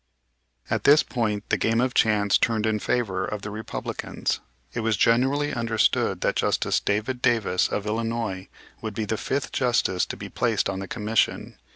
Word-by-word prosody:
At - - -1
this 150 +2 +6
point 105 -4 -2
the - - +1
game 115 +1 +2
of 125 0 +1
chance 105 -2 +3
turned 110 -2 +1
in 110 -1 +1
favor 100 -6 -1
of 105 +1 -4
the 105 - -5
Republicans. 110 +1 -3 0.3
It - - -3
was 110 -2 +1
generally 135 +7 +2
understood 115 -2 +1
that - - 0
Justice - - +1
David 110 +5 -1
Davis, 115 -8 +2
of 100 - -3
Illinois, 110 -3 -2 0.3
would 110 -2 -5
be 110 - -2
the 110 - -1
fifth 135 +5 -2
Justice 120 -8 +1
to - - -6
be - - -7
placed 115 -5 0
on 95 - -4
the 95 - -5
commission. 110 0 -1
110 Hz, 175 wpm, -25 LUFS, 105-120 Hz, 0.3 s, this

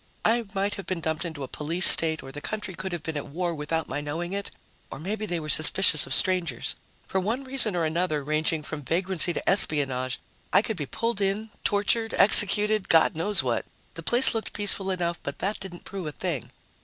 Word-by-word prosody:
I 230 +2 0
might 200 +1 -2
have 195 - -10
been 185 -2 -4
dumped 160 +2 -4
into 160 -4 -8
a - - -7
police 165 +7 0
state 160 -1 +9
or 135 - -11
the 145 - -10
country 210 0 -6
could 190 +2 -7
have 170 -3 -7
been 160 - -6
at 145 - -7
war 175 +3 -4
without 160 +1 -4
my 145 - -5
knowing 165 +5 -6
it, 200 0 -6 0.4
or - - -9
maybe 210 +7 -6
they 175 -3 -4
were 155 - -9
suspicious 155 +1 +6
of - - -3
strangers. 185 -3 +1 0.3
For 190 - -2
one 225 +8 -4
reason 260 -7 +1
or 170 -2 -2
another, 160 -2 -3
ranging 155 +1 -3
from 155 0 -8
vagrancy 175 +4 +2
to - - -7
espionage, 135 -8 +1 0.3
I - - +3
could 220 - -4
be 145 -4 -6
pulled 230 - -4
in, 205 +3 -3
tortured, 225 +2 -1
executed, 210 +1 +3
God 160 -1 +3
knows 175 0 0
what. 120 -3 -3 0.3
The 165 - -10
place 240 +10 +3
looked 225 -1 -6
peaceful 200 -1 -1
enough, 175 -2 -4
but 140 - -7
that 200 +3 -4
didn't 180 -2 -11
prove 190 -4 -8
a - - -5
thing. 140 - -6
175 Hz, 210 wpm, -24 LUFS, 155-200 Hz, 0.4 s, state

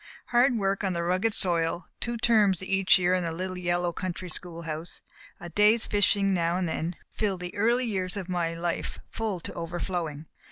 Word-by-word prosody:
Hard 245 +1 +4
work 195 -1 0
on 190 -2 0
the 170 0 -1
rugged 185 +6 +1
soil, 170 -3 0
two 235 0 -1
terms 215 -6 +3
each 195 0 +4
year 180 0 +2
in 185 -1 +1
the 165 - -2
little 185 +3 -4
yellow 175 0 0
country 185 +1 -4
schoolhouse, 165 -1 -5 0.4
a 175 - -8
day's 210 +6 +4
fishing 200 -1 +3
now 170 -1 +1
and 185 -1 0
then 165 +2 -2 0.2
filled 195 -4 -1
the 180 0 -5
early 235 +5 +2
years 190 -3 -2
of 190 -3 -4
my 170 -2 -1
life 170 0 -3
full 215 -5 -2
to - - -5
over 170 +1 -5
flowing. 160 -5 -3
185 Hz, 190 wpm, -27 LUFS, 170-200 Hz, 0.4 s, Hard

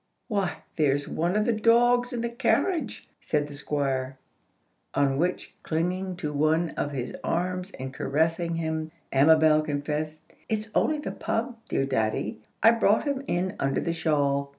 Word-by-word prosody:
"Why, 200 -5 -1
there's 145 -2 +2
one 175 +4 -1
of 210 0 +2
the 235 - +2
dogs 240 +3 +4
in 240 -2 -2
the 235 - -1
carriage," 255 +6 0
said 150 -2 0
the 145 - -10
Squire. 135 -2 -2 0.8
On 135 -1 +2
which, 180 +2 -1
clinging 180 +3 -1
to 150 -4 -4
one 155 +3 +2
of 145 - -2
his 130 -3 -4
arms 180 +2 -1
and 130 0 -5
caressing 165 +5 0
him, 160 -1 -2 0.2
Amabel 155 +2 +5
confessed, 155 +1 -3 0.3
"It's 215 0 -2
only 310 - +2
the 295 - -4
pug, 235 +2 -2
dear 135 - +1
daddy. 110 -5 -1 0.2
I 225 - +9
brought 220 -2 +3
him 280 -2 -2
in 185 +2 -1
under 135 0 +1
the 170 - -1
shawl. 140 -4 +1
160 Hz, 155 wpm, -27 LUFS, 145-210 Hz, 0.8 s, I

